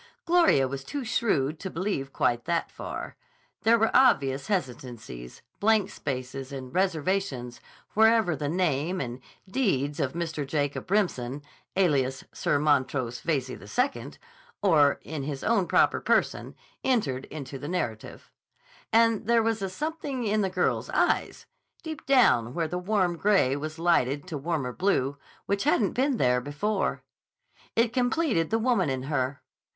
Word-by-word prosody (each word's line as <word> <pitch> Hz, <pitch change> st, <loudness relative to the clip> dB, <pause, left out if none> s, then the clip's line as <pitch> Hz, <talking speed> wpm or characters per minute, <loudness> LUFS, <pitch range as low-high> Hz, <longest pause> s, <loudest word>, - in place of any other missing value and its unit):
Gloria 335 Hz, -, +4 dB
was 135 Hz, +1 st, -5 dB
too 280 Hz, -, -5 dB
shrewd 155 Hz, -, 0 dB
to 190 Hz, -, -5 dB
believe 165 Hz, -7 st, -3 dB
quite 120 Hz, -2 st, 0 dB
that 170 Hz, 0 st, -1 dB
far. -, -, -6 dB, 0.5 s
There 230 Hz, +1 st, +5 dB
were 225 Hz, 0 st, +1 dB
obvious 140 Hz, -, +4 dB
hesitancies, 125 Hz, -, -5 dB, 0.2 s
blank 210 Hz, -2 st, +3 dB
spaces, 135 Hz, 0 st, -5 dB
and 130 Hz, -2 st, -7 dB
reservations 180 Hz, -8 st, -1 dB, 0.3 s
wherever 220 Hz, -5 st, +4 dB
the 145 Hz, 0 st, -3 dB
name 170 Hz, 0 st, 0 dB
and 125 Hz, -1 st, -4 dB, 0.3 s
deeds 160 Hz, -, 0 dB
of 140 Hz, -3 st, -1 dB
Mr. 165 Hz, -3 st, -3 dB
Jacob 145 Hz, +3 st, -2 dB
Remsen, 145 Hz, -10 st, 0 dB, 0.3 s
alias 140 Hz, -8 st, +1 dB
Sir 145 Hz, -, +1 dB
Montrose 130 Hz, -4 st, +1 dB
Veyze 145 Hz, -6 st, 0 dB
II, 250 Hz, -, -2 dB, 0.5 s
or 150 Hz, -7 st, +4 dB
in 155 Hz, -1 st, -5 dB
his 140 Hz, 0 st, -5 dB
own 205 Hz, -5 st, +2 dB
proper -, -, +3 dB
person, -, -, 0 dB, 0.3 s
entered 140 Hz, -, 0 dB
into 140 Hz, -3 st, -7 dB
the 145 Hz, -, -6 dB
narrative. 120 Hz, -11 st, -4 dB, 0.6 s
And 230 Hz, -2 st, +3 dB
there 235 Hz, -1 st, +4 dB
was 225 Hz, -2 st, 0 dB
a 195 Hz, -, -2 dB
something 290 Hz, -, -4 dB
in 215 Hz, 0 st, +1 dB
the 195 Hz, -, 0 dB
girl's 185 Hz, -1 st, 0 dB
eyes, -, -, 0 dB, 0.4 s
deep 315 Hz, -2 st, -7 dB
down 135 Hz, -, +4 dB
where 165 Hz, -2 st, 0 dB
the 180 Hz, +3 st, -3 dB
warm 180 Hz, -2 st, 0 dB
gray 190 Hz, -9 st, +3 dB
was 155 Hz, +2 st, -5 dB
lighted 145 Hz, -5 st, +1 dB
to 155 Hz, -, -3 dB
warmer 140 Hz, -5 st, -2 dB
blue, 145 Hz, -7 st, 0 dB, 0.3 s
which 200 Hz, +4 st, -1 dB
hadn't 230 Hz, -8 st, +2 dB
been 265 Hz, +1 st, +1 dB
there 125 Hz, -, +2 dB
before. 170 Hz, -, -2 dB, 0.7 s
It 230 Hz, +1 st, +2 dB
completed 250 Hz, -, +1 dB
the 225 Hz, -, +2 dB
woman 225 Hz, -, +2 dB
in 130 Hz, -1 st, -2 dB
her. 135 Hz, -1 st, -2 dB
165 Hz, 145 wpm, -27 LUFS, 135-210 Hz, 0.7 s, There